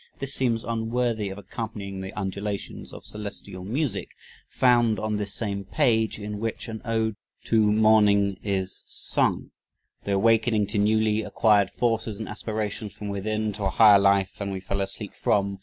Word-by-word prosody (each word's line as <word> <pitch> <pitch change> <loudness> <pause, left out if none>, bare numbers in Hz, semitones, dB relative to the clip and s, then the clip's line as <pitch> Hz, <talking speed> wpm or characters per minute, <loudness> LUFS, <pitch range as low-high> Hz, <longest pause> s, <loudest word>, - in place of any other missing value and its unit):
This 135 0 -3
seems 115 -3 +1
unworthy 115 -2 -1
of 95 - -7
"accompanying 100 -1 -6
the 95 0 -6
undulations 100 +1 -4
of - - -11
celestial 100 -3 -6
music" 120 +2 -2 0.4
found 120 -3 +3
on 110 -1 -1
this 105 -1 -3
same 100 -3 -2
page, 110 -1 +1
in 105 0 -5
which 115 +2 -4
an 110 -1 -6
"ode 110 -2 -1 0.3
to 110 -2 +3
morning" 105 -3 +4
is 95 -2 -2
sung - - 0 0.5
"the 100 - -1
awakening 110 +1 +3
to 105 - -1
newly 110 +1 +2
acquired 105 -3 +3
forces 115 -1 -1
and 110 - -6
aspirations 105 -1 -4
from 105 - -6
within 105 +2 -2
to 100 0 -4
a - - +2
higher 105 0 +7
life 100 -1 +3
than 100 -1 -3
we 95 -1 -3
fell 100 +1 -3
asleep 100 +2 -4
from 100 -1 0
105 Hz, 160 wpm, -25 LUFS, 100-110 Hz, 0.5 s, higher